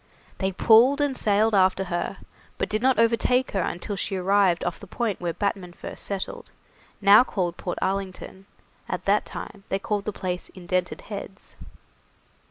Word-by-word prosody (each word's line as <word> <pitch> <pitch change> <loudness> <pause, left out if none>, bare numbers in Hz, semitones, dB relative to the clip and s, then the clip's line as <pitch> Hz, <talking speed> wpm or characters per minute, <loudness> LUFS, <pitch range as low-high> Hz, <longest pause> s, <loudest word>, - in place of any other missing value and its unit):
They 190 0 0
pulled 235 +8 +5
and 290 -2 +1
sailed 215 0 +2
after 190 -1 +3
her, 175 -2 -3 0.4
but - - -2
did 215 0 0
not 260 -1 +3
overtake 230 +3 +2
her 195 - 0
until 180 +4 -3
she 195 - -3
arrived 190 -1 +2
off 175 - -3
the - - -11
point 225 -7 -2
where 175 -1 -1
Batman 190 -1 -3
first - - -8
settled, 195 -2 -5 0.5
now 200 +4 +8
called 180 -8 -2
Port 180 - -5
Arlington; 190 0 -4 0.4
at - - -4
that - - +2
time 200 - -8
they 195 - +1
called 200 0 -2
the 215 - -1
place 180 -2 -4
Indented 180 -1 -2
Heads. 200 -1 -9
195 Hz, 165 wpm, -25 LUFS, 185-215 Hz, 0.5 s, now